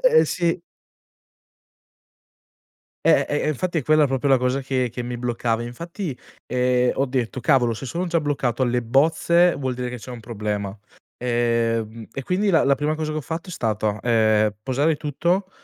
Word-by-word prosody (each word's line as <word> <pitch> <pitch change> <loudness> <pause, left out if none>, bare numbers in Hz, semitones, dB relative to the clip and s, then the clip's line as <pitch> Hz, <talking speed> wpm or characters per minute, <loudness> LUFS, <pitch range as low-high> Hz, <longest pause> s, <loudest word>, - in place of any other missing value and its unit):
Eh 475 -1 +6
sì. 170 -1 0 2.4
Eh, - - +5
e 150 +1 0
infatti 165 +3 -1
è - - -2
quella 155 +1 +4
proprio 135 +1 -1
la 135 -1 +5
cosa 125 +2 0
che 130 -2 -1
che 125 +1 -5
mi 120 0 -4
bloccava, 120 -1 -1
infatti, 165 - -6 0.3
ehm, 125 0 +2
ho 135 - +1
detto: 125 -1 -2
"Cavolo, 120 -1 +3
se 135 - -7
sono 175 +7 -2
già 170 -1 +1
bloccato 135 -4 -1
alle 120 -1 +1
bozze, 165 +7 +3
vuol 130 -2 -2
dire 125 0 -3
che 125 - -5
c'è 125 - -10
un 120 -2 -7
problema". 105 -2 -4 0.4
Ehm, 115 -2 0
e 135 - -5
quindi 190 +8 +1
la 165 - +4
la 140 0 +4
prima 150 +3 -1
cosa 155 -1 -3
che 155 - -2
ho - - -3
fatto, 165 +6 -6
è - - -6
stata, 110 -4 -1
ehm, 110 -3 +3
posare 145 +5 +1
tutto, 175 +7 -1
130 Hz, 175 wpm, -23 LUFS, 120-155 Hz, 2.4 s, Eh